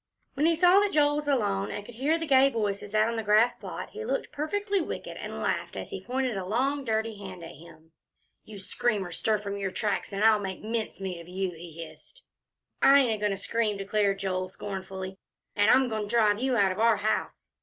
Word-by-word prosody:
When 295 +3 +2
he 335 - +4
saw 360 +3 +6
that 410 -1 +1
Joel 290 -1 +3
was 295 -1 -4
alone, 205 -8 +1
and 205 - -6
could 240 - -11
hear 280 +8 +1
the 325 - -3
gay 270 -2 +5
voices 205 -3 -3
out 215 +1 +4
on 230 0 -2
the - - 0
grass 215 +3 +4
plot, - - -8
he 445 - -6
looked - - -2
perfectly 400 +6 -1
wicked, - - -5
and - - -6
he - - -6
laughed - - -2
as - - -6
he - - -6
pointed 255 -2 -1
a 190 - -3
long 260 +9 0
and 270 - -10
dirty 220 -1 -1
hand 185 -3 -8
at 165 - -8
him. 160 0 -16 0.5
"You 215 -1 -11
scream, 200 +1 -1
or 175 - -8
stir 220 -1 +1
from 200 -1 -5
your 195 -1 -2
tracks, 205 +3 -2
and 200 +1 -2
I'll 220 -1 +6
make 190 -1 -5
mincemeat 195 -5 -3
of 170 - -14
you!" 185 +1 -2
he 165 -1 -9
hissed. - - -16 0.6
"I 275 - +7
ain't 250 -4 +1
a - - -2
goin' 210 0 +1
to 195 - -2
scream," 215 0 -1
declared 195 0 0
Joel, 185 -1 -2
scornfully, 190 -1 -6 0.4
"an' 205 +1 +4
I'm 260 0 +5
goin' 220 -2 -2
to - - -9
drive 210 -2 +3
you 255 -1 +1
out 195 -3 +4
of 185 - -5
our 225 -1 +4
house." 215 +1 -2
215 Hz, 235 wpm, -28 LUFS, 195-260 Hz, 0.6 s, I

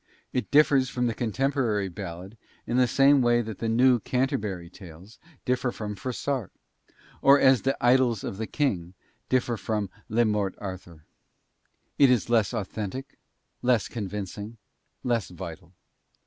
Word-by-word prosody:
It 125 - -2
differs 140 -3 +4
from 125 -1 -1
the 115 - 0
contemporary 120 -3 0
ballad 95 +2 -8 0.3
in 120 - -1
the 125 -1 +4
same 135 +3 +5
way 120 -1 +3
that 110 -3 -7
the 115 - -1
"New 125 +2 +4
Canterbury 105 -8 -2
Tales" 90 +3 -14 0.3
differ 125 0 0
from 105 -2 -5
Froissart; 130 +1 -3 0.7
or 140 +1 +7
as 130 -2 +5
the 135 - 0
"Idylls 120 -3 +3
of 95 - -5
the 110 +1 -4
King" 95 - -1 0.3
differ 125 -2 +1
from 105 -3 -2 0.2
"Le 115 +2 +3
Morte 105 -3 -1
Arthur." 90 -5 -8 0.9
It 140 -2 +7
is 120 -1 +1
less 110 -4 +3
authentic, 110 +3 -5 0.4
less 125 -4 +2
convincing, 105 0 -6 0.5
less 120 -4 0
vital. 85 -1 -9
115 Hz, 140 wpm, -26 LUFS, 100-125 Hz, 0.9 s, or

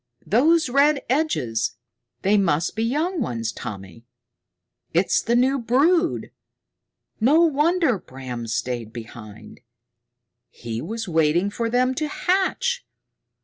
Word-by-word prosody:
"Those 310 +10 +3
red 280 +3 +3
edges? 125 - 0 0.5
They 200 +2 +3
must 170 -5 +1
be 220 - -2
young 305 +9 0
ones, 115 - -2
Tommy. 100 +1 -9 0.9
It's 180 +3 +3
the 235 - 0
new 260 +3 +3
brood! 310 +9 +1 0.9
No 280 +9 +4
wonder 320 - +2
Bram 130 -6 -7
stayed 115 0 -3
behind! 110 -2 -11 0.9
He 115 -1 -6
was 225 0 -5
waiting 165 +3 +2
for 230 +2 -2
them 250 +2 +2
to 305 +3 -2
hatch! 385 +9 0
230 Hz, 110 wpm, -23 LUFS, -, 0.9 s, No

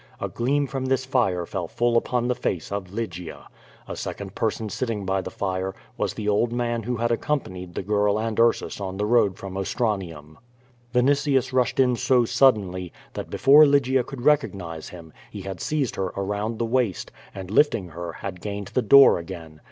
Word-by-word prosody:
A - - -3
gleam 140 +4 0
from 135 -1 -4
this 130 0 0
fire 105 -10 +1
fell - - -4
full 120 0 0
upon 120 +1 +1
the 125 - +2
face 90 -8 -3
of 100 -3 -4
Lygia. 90 -6 -6 0.4
A - - -5
second - - -6
person 110 - -2
sitting 110 -2 -3
by 95 0 0
the - - -6
fire, 95 -1 -3 0.2
was - - -2
the 105 - -4
old 105 +3 +2
man 120 -1 -1
who 125 +3 -2
had 120 +1 0
accompanied 95 - -3
the - - -3
girl 105 +1 +1
and 110 0 -2
Ursus 115 -3 +2
on 95 -1 -4
the 105 - 0
road 105 -4 +3
from 95 -1 -8
Ostranium. 95 - -3 0.5
Vinitius 135 +1 +2
rushed 130 0 +1
in 125 -2 +4
so 125 +1 +3
suddenly, 95 -9 +2 0.2
that - - -6
before 145 +3 +6
Lygia 135 -3 +3
could 125 0 -8
recognise 100 - 0
him, 85 -3 -12 0.2
he 100 - -8
had 95 -2 -6
seized 150 -5 -1
her 95 - 0
around 105 +3 -2
the 115 - -1
waist, 115 -5 -1 0.2
and 95 -1 -7
lifting 110 - +2
her, 85 +1 -6
had 90 0 -7
gained 100 -1 -5
the 125 - 0
door 135 -1 +7
again. 80 -3 -9
105 Hz, 185 wpm, -24 LUFS, 95-125 Hz, 0.5 s, door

